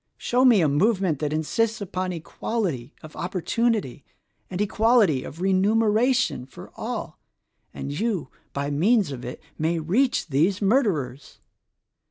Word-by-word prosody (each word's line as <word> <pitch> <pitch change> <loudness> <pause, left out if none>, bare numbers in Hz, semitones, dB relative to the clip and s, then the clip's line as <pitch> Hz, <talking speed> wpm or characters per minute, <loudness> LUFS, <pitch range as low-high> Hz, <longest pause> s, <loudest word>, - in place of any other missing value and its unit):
Show 250 +1 +1
me 235 -7 +6
a 160 - +3
movement 185 - +1
that 150 -1 -2
insists 220 +9 0
upon 185 -2 -3
equality 170 - -3
of 155 - -11
opportunity 185 - -1 0.5
and 180 - -5
equality 210 - +3
of 165 - -9
remuneration 215 - +2
for - - -12
all, - - -5 0.5
and 140 - -6
you 190 - -2 0.2
by 140 +1 -3
means 195 +4 +2
of 125 -3 -7
it 125 - -6 0.2
may 165 +2 +1
reach 190 - +1
these 165 +8 +2
murderers! 195 - 0
185 Hz, 130 wpm, -24 LUFS, 150-225 Hz, 0.5 s, me